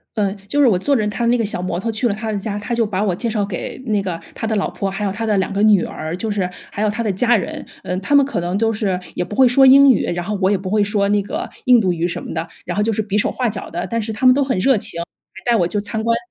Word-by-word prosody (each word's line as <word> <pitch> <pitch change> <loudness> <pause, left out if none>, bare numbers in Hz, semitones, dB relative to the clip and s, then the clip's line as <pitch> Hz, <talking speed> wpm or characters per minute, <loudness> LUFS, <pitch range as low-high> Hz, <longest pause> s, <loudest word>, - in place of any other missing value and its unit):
嗯， 205 -2 0
就 290 - +1
是 285 - +6
我 220 -6 +4
坐 280 +9 +1
着 215 -3 0
他 210 +3 -2
的 - - +2
那 245 - +3
个 230 - 0
小 200 -3 0
摩 185 - -2
托 225 +5 -2
去 225 +3 0
了 205 - -1
他 220 +1 -4
的 205 - -1
家， 205 +1 -4
他 205 +4 -3
就 230 -1 +2
把 205 -2 -2
我 190 -4 0
介 230 +6 -2
绍 210 -2 0
给， 195 +4 -6
那 210 -3 +1
个 180 -3 -4
他 225 - -4
的 220 - 0
老 200 - 0
婆， 195 - -3
还 195 +2 -4
有 195 - -1
他 225 +3 -4
的 215 -2 +1
2 190 +2 -1
个 200 +1 0
女 210 -4 +5
儿， 160 +2 -5
就 220 +5 -4
是 200 -3 -1 0.2
还 205 - -3
有 215 - +2
他 215 +3 -3
的 210 - 0
家 235 +5 +3
人。 200 - -4 0.2
嗯， 180 - -2
他 200 +9 -1
们 280 - +6
可 270 - -2
能 175 +3 -2
都 225 +1 +1
是 205 -4 -1 0.2
也 - - -1
不 205 +3 -8
会 260 - +6
说 250 +2 +5
英 275 +1 +8
语， 235 - +3
然 175 0 -2
后 210 +3 -2
我 190 - +3
也 200 - +2
不 185 0 -6
会 210 +2 +2
说 200 -1 +1
那 205 0 +2
个 310 - -5 0.2
印 250 -2 +6
度 185 -4 +1
语 170 0 -1
什 175 - -4
么 - - -7
的。 165 +1 -3 0.2
然 175 - -4
后 210 - +2
就 225 +1 +1
是 220 - -1
比 205 -1 -2
手 210 - +2
画 250 -2 -1
脚 210 - -5
的， 175 +1 -3
但 230 -1 -1
是 220 +1 -4
他 215 +4 0
们 255 - +8
都 280 - +2
很 265 -6 0
热 265 +7 +3
情， 180 -4 -2
还 205 +7 -5
带 - - +4
我 175 -5 +1
去 205 - -2
参 210 +2 -3
观 230 +1 +2
210 Hz, 355 characters per minute, -19 LUFS, 190-230 Hz, 0.2 s, 英